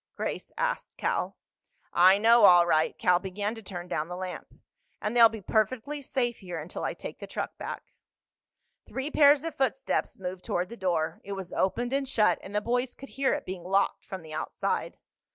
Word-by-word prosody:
Grace - - -4
asked - - -2
Cal. - - -1 0.6
"I 185 +2 +7
know, 230 +2 +6
all 175 -2 +8
right." 155 -2 +2
Cal 180 -1 +3
began 200 +3 -3
to 225 - -9
turn 180 -4 -7
down 150 0 -2
the 180 - -6
lamp. 185 0 -6 0.5
"And 210 +3 -3
they'll 230 -1 +8
be 220 -2 -8
perfectly 240 +8 0
safe 245 -3 -1
here 180 -4 -6
until 160 +3 -6
I - - -2
take - - -8
the - - -7
truck - - -4
back." - - -7 0.9
Three 265 +3 -4
pairs 290 -1 +6
of 330 -1 -3
footsteps 270 -2 -1
moved 185 -1 -6
toward 180 +1 -1
the 235 - -8
door. 175 -6 -1
It 200 - -5
was 190 -2 -7
opened 240 +6 0
and 275 0 0
shut, 220 -5 +3
and 200 - -9
the 210 - +2
boys 245 +3 -1
could 275 - -11
hear 270 0 +1
it - - -6
being 185 -2 -6
locked 195 +2 +1
from 190 -3 -7
the 155 -1 -10
outside. 155 - -2
205 Hz, 195 wpm, -28 LUFS, 180-245 Hz, 0.9 s, all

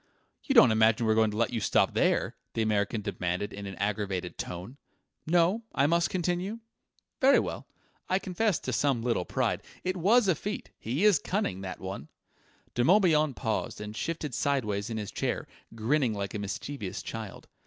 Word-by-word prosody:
"You 275 - 0
don't 130 - +8
imagine 110 +1 +4
we're 110 - +4
going 110 0 +3
to 105 - -5
let 115 +1 +1
you 115 - 0
stop 100 - +2
there?" - - +1 0.2
The 115 - +1
American 105 0 0
demanded 90 0 -2
in 100 0 -6
an 95 - -6
aggrieved 100 -3 -2
tone. 90 +10 -6 0.5
"No? 175 +6 +3
I 140 - +4
must 170 +3 +2
continue? 180 +4 -1 0.6
Very 275 +1 +6
well: - - -4 0.4
I 185 - +3
confess 195 +1 0
to - - -3
some 135 -5 +1
little 115 -7 0
pride. - - 0 0.2
It 185 0 -1
was 205 +6 +4
a 185 - +5
feat. 205 +7 -5
He 135 - 0
is 210 -4 +6
cunning, 185 - -2
that 95 -1 -6
one!" 95 -6 -6 0.7
De 120 - +1
Morbihan 155 - +4
paused 110 -2 -2
and 105 0 -6
shifted 160 0 -3
sideways 110 -8 0
in 115 - -3
his 105 -2 -4
chair, - - -2 0.3
grinning 120 +1 +1
like 100 -1 -4
a 105 - -3
mischievous 100 0 -5
child. 110 -3 -7
115 Hz, 175 wpm, -29 LUFS, 105-170 Hz, 0.7 s, don't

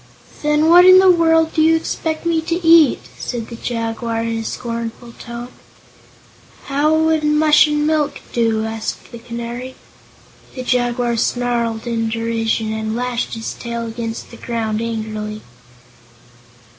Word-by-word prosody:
"Then 300 +1 +2
what 350 +2 +8
in 370 0 +9
the 375 0 +7
world 325 -2 +3
do 315 - +2
you 325 +1 +5
expect 320 0 -3
me 330 -1 +1
to 335 +2 -3
eat?" 325 -4 +6 0.2
said 235 -3 -5
the 235 - -7
Jaguar 230 -1 -3
in 230 0 -2
a - - -4
scornful 235 0 -5
tone. 235 +1 -7 1.1
"How 285 +2 +1
would 320 -1 +2
mush 300 0 +5
and 295 0 0
milk 305 -2 0
do?" 225 -2 +1
asked 220 0 -5
the 235 - -9
Canary. 235 +2 -7 0.8
The 255 - -5
Jaguar 245 -1 0
snarled 235 -1 -1
in 230 -1 -1
derision 225 -1 -1
and 220 0 -3
lashed 245 -1 -2
his 225 0 -5
tail 235 -1 -5
against 230 0 -6
the 235 - -11
ground 225 -2 -3
angrily. 215 -2 -4
240 Hz, 145 wpm, -18 LUFS, 225-300 Hz, 1.1 s, in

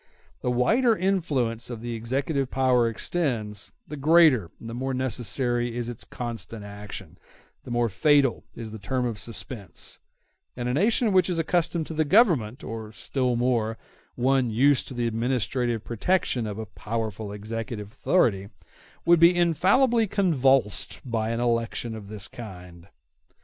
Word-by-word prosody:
The - - -1
wider 225 - +3
the - - -10
influence 145 - 0
of 120 -3 -6
the 120 0 -4
executive 135 +4 -1
power 125 -3 +3
extends, 115 -7 -2 0.2
the 150 - -6
greater 150 - +5
and 115 - -9
the 115 - -6
more 130 +2 -2
necessary 120 -1 -1
is 120 -1 -3
its 120 - -5
constant 115 -2 -6
action, 105 0 -9 0.5
the - - -9
more 120 0 +1
fatal 140 +4 +3
is 115 -2 -7
the 110 - -8
term 125 +5 -1
of 115 -4 -3
suspense; 110 -3 -5 0.6
and 120 -1 -2
a 125 - 0
nation 215 - +2
which 185 0 +4
is 175 - -1
accustomed 165 0 0
to 160 - -6
the 155 0 +2
government, 150 - +3
or, 110 -1 -6
still 125 +2 -1
more, 115 -2 0 0.4
one 130 0 +2
used 130 +4 +3
to 130 - -7
the 120 -1 -1
administrative 120 0 -1
protection 120 - 0
of 105 -1 -5
a 110 - -4
powerful 110 0 -4
executive 105 0 -5
authority 100 - +1 0.6
would 170 -1 +6
be 170 +2 +7
infallibly 205 - +3
convulsed 135 - +2
by 115 -3 -1
an 115 0 -1
election 115 -1 -1
of 105 -2 -9
this 100 -2 -3
kind. 90 -6 -11
120 Hz, 155 wpm, -26 LUFS, 110-145 Hz, 0.6 s, be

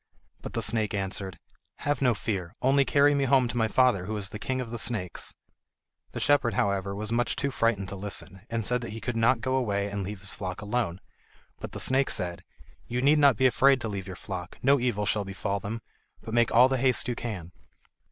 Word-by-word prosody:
But - - -8
the - - +2
snake 110 -4 +2
answered: 95 -2 -3 0.4
"Have 145 0 -1
no 125 -4 +3
fear; 95 -3 -4
only 135 +1 +4
carry 145 +2 +4
me 140 -1 +1
home 130 -1 +4
to - - -5
my 115 -2 +2
father 120 -6 +3
who 110 0 -3
is 100 -2 -1
the 105 - -7
King 130 +2 -2
of 120 -3 -5
the 120 - -4
Snakes." 105 -7 -2 0.8
The - - -4
shepherd, 135 -7 +2
however, 100 -1 0
was 105 +2 -4
much 120 0 0
too 140 0 -1
frightened 115 -5 0
to - - -6
listen, 95 -1 -4
and 115 -2 -2
said 125 0 +1
that 115 -3 -6
he 110 - -6
could 120 +1 -3
not 115 +1 +3
go 130 +2 0
away 100 -5 0
and 100 0 -3
leave 100 0 -6
his 100 - 0
flock 90 0 -5
alone; 105 -4 -2 0.6
but - - -7
the - - -6
snake 135 +1 +2
said: 85 -1 -2 0.4
"You 120 - -2
need 150 +2 +5
not 140 -6 +5
be 130 - +2
afraid 135 +2 +5
to 115 - -3
leave 100 -2 -5
your 95 - -6
flock, 90 -2 -7
no 140 +2 +5
evil 120 -4 0
shall 105 0 +1
befall 100 +1 -3
them; 110 +3 -5 0.4
but 110 - -7
make 120 0 +3
all 125 +3 +7
the 130 -1 -1
haste 130 0 +2
you 125 - 0
can." 100 -8 -6
115 Hz, 225 wpm, -27 LUFS, 100-130 Hz, 0.8 s, all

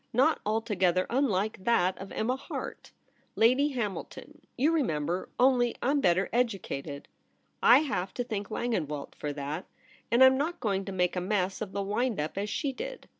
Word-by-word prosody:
Not 265 +7 +3
altogether 195 -5 +1
unlike 215 -7 0
that 190 -5 +2
of 195 - -8
Emma 245 +4 0
Harte, 265 - -7 0.4
Lady 255 +6 +4
Hamilton 215 -6 -5
— - - -44
you 285 +6 +3
re 325 -2 +2
member 165 - -2
— - - -37
only 245 -2 +1
I'm 280 +2 +1
better 185 -3 +3
educated. 190 - -2 0.5
I 245 +5 +7
have 230 -11 -2
to 245 - -1
thank 210 -4 -4
Langenwelt 165 -12 -3
for 150 - -4
that; 145 +5 -5 0.4
and 240 +3 +5
I'm 260 0 +6
not 330 +5 -2
going 195 -3 -1
to 195 - -5
make 180 -1 0
a 180 - -1
mess 190 0 -1
of 210 -3 -4
the 200 - -1
wind 215 +2 -1
up 150 +1 -3
as 205 +1 -2
she 275 +6 -2
did. - - -7
215 Hz, 180 wpm, -29 LUFS, 185-255 Hz, 0.5 s, I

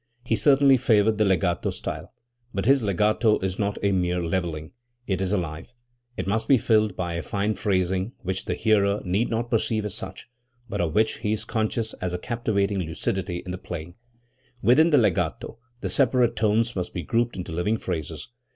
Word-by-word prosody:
He 115 - +1
certainly 140 0 +5
favored 110 -2 +3
the 105 - +4
legato 90 -3 +1
style. 80 +4 -5 0.4
But 100 - -1
his 135 +2 +5
legato 105 +2 +2
is 95 0 -2
not 100 -1 -1
a 100 - +3
mere 90 -1 +1
levelling; 80 -3 -2 0.3
it 95 -3 -1
is 95 -1 -1
alive. 85 +3 -3 0.4
It - - -2
must 110 +3 -1
be 135 - +6
filled 110 -3 +2
by 85 -2 -3
a 85 - -2
fine 105 +3 -1
phrasing 95 +1 0
which 95 +1 -3
the - - -1
hearer 105 -2 +2
need 95 +6 +1
not 115 +1 -2
perceive 110 -2 0
as 105 - -4
such, - - -7 0.4
but 110 - -2
of 80 -3 -1
which 110 +1 +2
he 110 -2 0
is 110 - -3
conscious 110 0 -1
as 90 -1 -2
a - - -1
captivating 100 -2 -1
lucidity 85 +1 -3
in 90 - -5
the 90 - -5
playing. 85 -1 -7 0.7
Within 135 +10 +5
the 150 - +5
legato, 110 +1 0 0.2
the - - -2
separate 125 -3 +3
tones 110 +2 +1
must 90 -2 -4
be 90 - -3
grouped 120 +7 0
into 90 - -5
living 90 +7 0
phrases. 85 - -5
100 Hz, 190 wpm, -25 LUFS, 90-110 Hz, 0.7 s, be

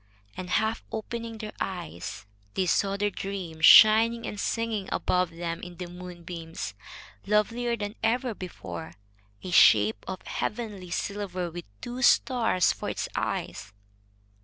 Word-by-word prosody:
And, 180 -1 -6
half 220 +4 +1
opening 230 +1 -5
their 215 -1 -7
eyes, 170 - -5 0.3
they 190 - +1
saw 195 +2 +1
their 205 0 0
dream 185 -5 -5
shining 225 +6 +8
and 210 - -5
singing 225 -4 -2
above 180 -1 +1
them 165 0 -5
in 175 -1 -9
the 180 - -5
moonbeams, 175 - -7 0.5
lovelier 235 +3 +1
than 205 -1 -4
ever 240 +2 +1
before, 180 -4 -8 0.5
a 185 - -5
shape 105 -8 +6
of 185 - -5
heavenly 210 -5 -4
silver, 185 -2 -3
with 175 +1 -7 0.2
two 245 +1 -5
stars 235 -9 +4
for - - -5
its - - -3
eyes. 95 +3 -3
195 Hz, 135 wpm, -27 LUFS, 175-220 Hz, 0.5 s, shining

